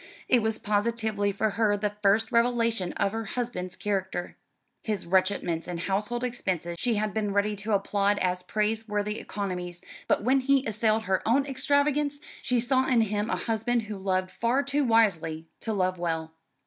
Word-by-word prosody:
It 245 - +4
was 220 0 0
positively 210 -1 0
for 210 +2 0
her 205 0 +2
the 205 0 -1
first 210 +2 +3
revelation 230 -5 +2
of 200 -1 0
her 225 +1 -3
husband's 200 -6 -3
character. 190 -3 -3 0.5
His 215 -3 -2
retrenchments 180 -2 +1
in 175 -1 -4
household 210 +7 -1
expenses 185 -8 -2
she 240 -3 +1
had 210 0 -1
been 210 -2 -1
ready 205 +1 +1
to 210 +2 -2
applaud 200 +1 +2
as 180 -1 0
praiseworthy 210 +1 -1
economies; 180 -3 -4 0.3
but - - +2
when 265 +4 +4
he 275 0 +2
assailed 220 0 +1
her 190 -3 +1
own 270 +5 +3
extravagance, 285 +1 +1 0.2
she 250 -2 +1
saw 260 +2 +2
in 240 -3 +4
him 210 0 -1
a - - +1
husband 230 +1 0
who 210 -1 -6
loved 185 -1 -1
far 245 +4 +1
too 280 +1 +1
wisely 190 -10 +2
to 225 - -3
love 185 -3 0
well. 160 -2 -2
210 Hz, 170 wpm, -27 LUFS, 190-235 Hz, 0.5 s, It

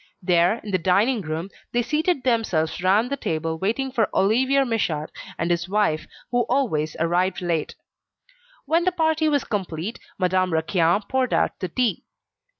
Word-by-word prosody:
There, 175 +2 +3
in 210 - -6
the 185 - +1
dining 205 +7 +2
room, 160 +2 -4 0.2
they 240 0 +2
seated 305 +1 0
themselves 215 -11 0
round 205 +7 +2
the - - +1
table 160 - -2
waiting 230 +8 -1
for 230 -4 +1
Olivier 260 +8 +3
Michaud 170 - -1 0.3
and 170 +2 -1
his 175 +1 -1
wife 195 -7 +1 0.2
who 245 0 +2
always 180 - 0
arrived 175 +3 +1
late. 170 -4 -2 0.9
When 325 +4 +2
the 370 - +3
party 320 -2 +1
was 290 -2 +1
complete, 190 0 -4 0.2
Madame 185 -1 +1
Raquin 170 +4 +2
poured 260 -1 +1
out - - 0
the 185 - -3
tea. 245 +5 0
195 Hz, 155 wpm, -23 LUFS, 170-250 Hz, 0.9 s, There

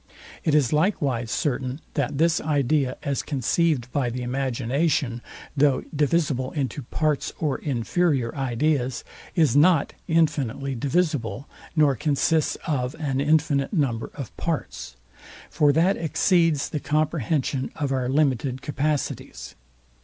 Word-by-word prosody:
It 155 - +2
is 140 -4 +3
likewise 145 - +1
certain 130 -1 -1
that 140 -1 -1
this 160 +1 +3
idea, 140 -3 +1
as 140 -1 -1
conceived 140 -1 0
by 130 -3 0
the 125 +1 -4
imagination, 130 0 -1 0.3
though 140 -2 +3
divisible 145 -3 +1
into 145 -1 -2
parts 150 +3 -1
or 150 -4 -1
inferior 135 0 0
ideas, 130 -1 0 0.3
is 155 -8 +3
not 155 0 +4
infinitely 140 -5 +1
divisible, 140 - -1 0.3
nor 150 -4 +4
consists 150 +4 +1
of 130 -2 -1
an 140 -4 -1
infinite 145 -1 +2
number 130 - 0
of 135 -6 -7
parts: 160 - -4 0.6
For 145 -1 +4
that 170 +6 +3
exceeds 165 -1 +2
the 150 - -3
comprehension 145 -3 0
of 145 -3 -2
our 130 -2 0
limited 135 -2 +1
capacities. 145 0 -3
140 Hz, 120 wpm, -24 LUFS, 130-155 Hz, 0.6 s, not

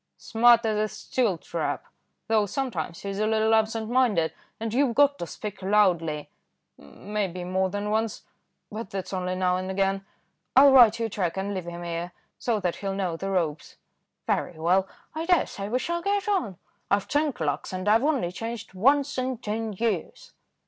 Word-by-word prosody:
"Smart 235 0 +4
as 215 -1 +1
a 215 - +1
steel 215 -3 -1
trap, - - -3 0.4
though 215 -2 +2
sometimes 180 - -3
he's 200 0 -4
a 215 - +1
little 220 0 +2
absent 220 0 +1
minded; 230 -10 +2 0.3
and 225 0 -3
you've 255 -2 +2
got 285 +1 +4
to 170 - -4
speak 210 +2 -7
loudly, 180 -7 +2 0.5
maybe 185 - -5
more 185 +1 0
than 205 +2 -3
once, 220 0 -1 0.5
but 215 -1 -6
that's 195 0 -5
only 185 0 -2
now 185 0 +1
and 185 0 -4
again. 195 0 0 0.5
I'll 275 +1 +8
write 235 -4 +7
you 230 - 0
a - - -3
cheque 190 -4 -2
and 200 +1 -2
leave 185 -3 -4
him 175 0 -6
here, 170 +1 -4 0.3
so 230 -3 0
that 180 -2 -1
he 200 - -5
will 195 - -1
know 185 -4 -1
the 195 +4 -4
ropes." 165 -6 -2 0.5
"Very 175 - -1
well, 180 +4 +2 0.3
I 320 +2 -4
daresay 210 - +1
we 245 - +1
shall 340 +6 -2
get 400 +1 0
on. 350 - 0 0.3
I've 200 0 +1
ten 295 0 +1
clerks, 155 - -3
and 185 +1 -4
I've 220 +4 +4
only 275 - +1
changed 225 +1 -6
once 275 +7 +2
in 255 0 -2
ten 220 0 -3
years." 235 - -3
210 Hz, 185 wpm, -26 LUFS, 185-235 Hz, 0.5 s, I'll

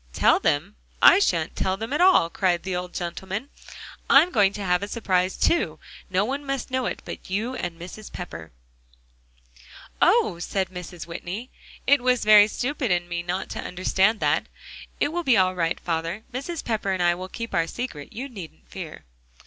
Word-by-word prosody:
"Tell - - +4
them? 175 +9 0 0.2
I - - +8
shan't 170 - 0
tell 190 0 0
them 225 +6 -5
at 295 - +1
all," 365 - +6
cried 180 -2 +1
the 190 -1 -3
old 180 0 -4
gentleman; 190 +7 -4 0.6
"I'm 310 +6 +6
going 205 -5 +4
to 205 - -5
have 180 0 +2
a 200 - -3
surprise, 185 -5 0
too. 340 - +1 0.3
No 190 +2 +1
one 275 +4 -3
must 275 -2 -3
know 260 -1 0
it - - -5
but - - -8
you 215 +7 -1
and 175 -9 -5
Mrs. 185 +5 -9
Pepper." 80 - -8 1.5
"Oh!" 170 - +4
said 190 +1 -2
Mrs. 180 -2 -8
Whitney. 185 +8 -6 0.3
"It 285 -1 +5
was 250 -2 +2
very 210 -1 +8
stupid 255 +3 -2
in 175 -1 +1
me 175 -1 -3
not 180 +2 -3
to - - -5
understand 190 +4 +1
that. - - +1 0.5
It - - +2
will 350 +3 -2
be 255 -8 +4
all 185 -1 +3
right, 170 -2 -1
father; 165 +5 -3
Mrs. 295 +6 -4
Pepper 215 -4 -1
and 185 -2 0
I 175 0 +4
will 185 +2 -7
keep 230 +3 -6
our 165 -1 +1
secret, 165 - -6
you 260 +5 -5
needn't 195 - -11
fear." - - -8
190 Hz, 185 wpm, -25 LUFS, 175-245 Hz, 1.5 s, I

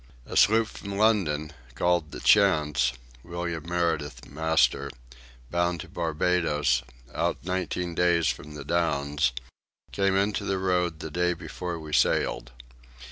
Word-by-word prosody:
A - - -7
sloop 110 +1 +5
from 100 -1 -7
London, 90 -9 +2 0.2
called 85 -3 +1
the - - -8
Chance, 75 - +3 0.3
William 85 -1 -5
Meridith, 85 -4 -1
master, 75 -2 +1 0.6
bound 85 -1 0
to - - -11
Barbados, 80 -5 +1 0.3
out - - 0
nineteen 90 -1 -2
days 85 -1 +2
from 75 0 -4
the 70 -2 -8
Downs, 75 -4 +1 0.6
came 100 -1 +1
into 100 +1 +1
the 95 - -1
road 90 -3 0
the 80 - -6
day 90 +2 +1
before 85 +1 -5
we 80 -1 -9
sailed. 65 - +1
85 Hz, 130 wpm, -27 LUFS, 75-90 Hz, 0.6 s, sloop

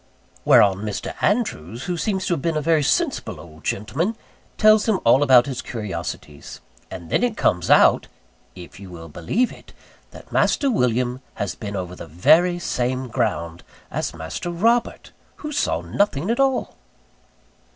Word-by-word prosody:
Whereon 100 -2 +5
Mr. 105 +1 -5
Andrews, 125 - -1
who 180 - -2
seems 190 +1 -2
to 180 - 0
have 160 - -2
been 165 0 -1
a - - +2
very 160 0 +2
sensible 145 - -1
old 80 0 -14
gentleman, 140 - -2 0.4
tells 215 0 +5
him 205 - +2
all 125 +4 +5
about 130 -4 +6
his 135 -3 -4
curiosities: 85 - -7 0.3
and 85 -3 -9
then - - +2
it 235 -3 0
comes 90 -1 +1
out - - +5 0.5
if 90 -1 -12
you 100 -2 -10
will 80 -2 -10
believe 195 - -1
it - - -15 0.4
that - - -14
Master 280 -2 +2
William 125 - 0
has 100 -4 -3
been 100 +3 -7
over 90 -2 -5
the - - -10
very 160 - +3
same 130 -5 -2
ground 90 - -2 0.3
as - - -2
Master 80 - -5
Robert, 230 +8 0 0.2
who 300 - -7
saw 290 - 0
nothing 200 -2 0
at 235 - -1
all. 270 -2 0
125 Hz, 160 wpm, -22 LUFS, -, 0.5 s, about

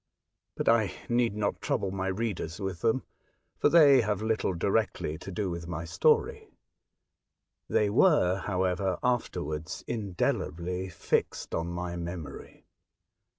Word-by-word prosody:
But - - -3
I 110 -4 +4 0.2
need 120 -3 +2
not 105 -1 -1
trouble 95 - -1
my 95 0 -2
readers 95 -4 -3
with, 95 -4 -4
them, 115 +3 +1 0.6
for - - +4
they 145 -6 +7
have 105 -2 -1
little 110 -4 0
directly 100 -4 0
to 95 - -8
do 95 0 -2
with 85 -1 -5
my 85 -1 -4
story; 85 +1 +1 1.2
they 105 - +3
were, 105 - +4
however, 95 -1 0
afterwards 80 -10 -2
indelibly 90 -4 -2
fixed 85 -1 -1
on 85 +1 -1
my 85 0 -4
memory. 85 -5 -7
95 Hz, 125 wpm, -29 LUFS, 85-110 Hz, 1.2 s, they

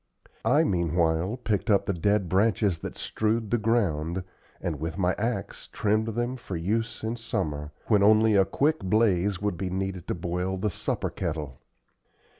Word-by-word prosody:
I 150 +5 +4
meanwhile 85 - +1
picked 110 -2 -1
up 100 -2 +4
the 100 - 0
dead 100 +2 +1
branches 100 -1 +2
that - - -6
strewed 110 0 -1
the 120 - +2
ground, 95 -6 0 0.4
and 80 -5 -3
with 80 +1 -4
my 90 -1 +2
axe 115 +3 -3
trimmed 110 +1 0
them 120 +2 -1
for 100 -6 -6
use 110 +8 -2
in 115 +2 -2
summer, 75 -10 -3
when 105 -3 +3
only 110 +1 +5
a 95 - +6
quick 145 +11 +1
blaze 95 -2 +2
would 105 -4 0
be 95 +1 -2
needed 95 -1 -3
to - - -1
boil 90 +2 -2
the 105 +2 -1
supper - - -2
kettle. 75 -7 -4
95 Hz, 165 wpm, -27 LUFS, 85-110 Hz, 0.4 s, a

